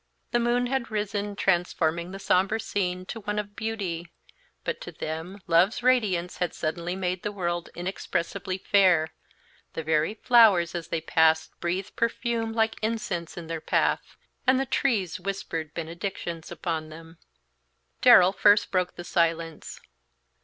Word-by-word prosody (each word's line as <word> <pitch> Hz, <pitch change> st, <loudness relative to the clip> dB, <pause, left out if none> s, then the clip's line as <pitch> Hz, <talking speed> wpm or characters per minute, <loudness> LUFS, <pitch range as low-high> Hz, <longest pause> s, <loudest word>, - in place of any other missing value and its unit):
The 240 Hz, -, +2 dB
moon 240 Hz, +1 st, +2 dB
had 260 Hz, -1 st, -1 dB
risen, 205 Hz, -1 st, -2 dB
transforming 170 Hz, -3 st, 0 dB
the 195 Hz, -, -7 dB
sombre 195 Hz, +3 st, +2 dB
scene 185 Hz, -4 st, -2 dB
to 225 Hz, -, -6 dB
one 210 Hz, 0 st, -3 dB
of 205 Hz, -1 st, -4 dB
beauty, 195 Hz, -7 st, -3 dB, 0.5 s
but -, -, -3 dB
to -, -, -7 dB
them 160 Hz, +5 st, -6 dB
Love's 185 Hz, +7 st, +3 dB
radiance 205 Hz, -9 st, +2 dB
had 180 Hz, -1 st, -2 dB
suddenly 170 Hz, +3 st, -3 dB
made 185 Hz, -1 st, -2 dB
the 210 Hz, -, -3 dB
world 175 Hz, -3 st, -3 dB
inexpressibly 185 Hz, +1 st, -3 dB
fair; 185 Hz, -5 st, +3 dB, 0.6 s
the 160 Hz, -, -4 dB
very 160 Hz, +5 st, +1 dB
flowers 220 Hz, -8 st, +5 dB
as 170 Hz, -2 st, -4 dB
they 165 Hz, -1 st, -2 dB
passed 160 Hz, 0 st, +3 dB
breathed 185 Hz, +3 st, -3 dB
perfume 230 Hz, -1 st, -1 dB
like 225 Hz, 0 st, 0 dB
incense 210 Hz, -7 st, -3 dB
in 170 Hz, -, -6 dB
their 165 Hz, -1 st, -4 dB
path, -, -, 0 dB, 0.3 s
and 260 Hz, 0 st, +5 dB
the 270 Hz, -, 0 dB
trees 220 Hz, -, 0 dB
whispered 175 Hz, -5 st, -4 dB
benedictions 170 Hz, 0 st, -5 dB
upon 160 Hz, -3 st, -3 dB
them. 165 Hz, +1 st, -12 dB, 0.8 s
Darrell 185 Hz, +1 st, +8 dB
first 205 Hz, +1 st, +4 dB
broke 180 Hz, -1 st, 0 dB
the 175 Hz, -, -7 dB
silence. 165 Hz, -2 st, -1 dB
185 Hz, 145 wpm, -26 LUFS, 170-210 Hz, 0.8 s, Darrell